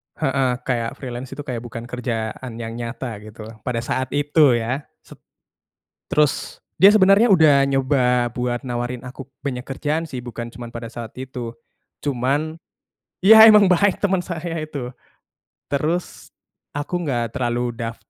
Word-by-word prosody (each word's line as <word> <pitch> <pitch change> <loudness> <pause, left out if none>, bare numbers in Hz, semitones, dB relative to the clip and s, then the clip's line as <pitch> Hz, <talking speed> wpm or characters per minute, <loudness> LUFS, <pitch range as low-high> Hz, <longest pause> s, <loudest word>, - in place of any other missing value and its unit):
Heeh, 135 -2 +1
kayak 120 -3 -2
freelance 125 +1 -7
itu 145 - -6
kayak 125 -4 -4
bukan 115 0 -8
kerjaan 120 -1 -4
yang 115 -1 -5
nyata 120 -1 -5
gitu 110 +1 -10 0.2
pada 120 -2 -1
saat 130 +2 -1
itu 145 -2 +4
ya 120 +5 -2 0.2
se - - -23 1.0
terus 150 -2 +1 0.2
dia 195 +5 +7
sebenarnya 205 +2 +5
udah 155 -6 +6
nyoba 130 -3 +2
buat 125 +1 -2
nawarin 120 0 -3
aku 135 +1 -10
banyak 125 -3 -4
kerjaan 150 +4 -2
sih 135 -6 -6
bukan 120 -1 -7
cuman 120 0 -8
pada 115 -1 -8
saat 115 -2 -6
itu. 125 -3 -6 0.5
Cuman 140 +4 0 0.7
iya, 220 +2 +10
emang 210 -2 +7
baik 185 +2 +3
temen 190 -3 +1
saya 170 -1 -5
itu, 140 -5 -6 0.8
terus, 160 +5 -2 0.5
aku 155 +5 -2
gak 120 -4 -1
terlalu 120 -2 -1
daf 115 0 -4
130 Hz, 145 wpm, -21 LUFS, 120-150 Hz, 1.0 s, iya